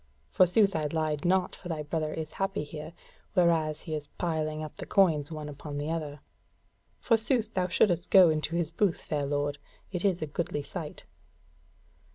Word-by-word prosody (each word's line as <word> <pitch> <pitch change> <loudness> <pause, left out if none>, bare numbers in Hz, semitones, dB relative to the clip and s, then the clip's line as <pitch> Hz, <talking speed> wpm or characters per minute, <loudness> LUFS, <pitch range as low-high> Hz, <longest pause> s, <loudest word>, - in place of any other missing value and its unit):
Forsooth 195 +2 +4
I 155 -1 0
lied 155 -2 -1
not, 185 +1 +2
for 180 - -10
thy 155 -2 -2
brother 155 +1 -2
is 155 -1 -5
happy 195 -4 -2
here, 155 +2 -8 0.4
whereas 165 -4 +2
he 160 - -6
is 150 -1 -4
piling 155 -2 -1
up 155 - -8
the - - -7
coins 160 -6 +3
one 155 -1 -5
upon 145 0 -7
the 145 +2 -2
other. 150 -3 -4 0.8
Forsooth 230 -1 +2
thou 185 -1 +1
shouldest 175 0 +2
go 185 -4 +8
into 155 +1 -1
his 170 -2 0
booth, 185 0 +1
fair 145 -3 -2
lord; 145 0 -1 0.3
it 180 -2 -3
is 185 -5 +1
a - - 0
goodly 150 -1 -3
sight." 160 -1 -7
160 Hz, 175 wpm, -29 LUFS, 150-180 Hz, 0.8 s, go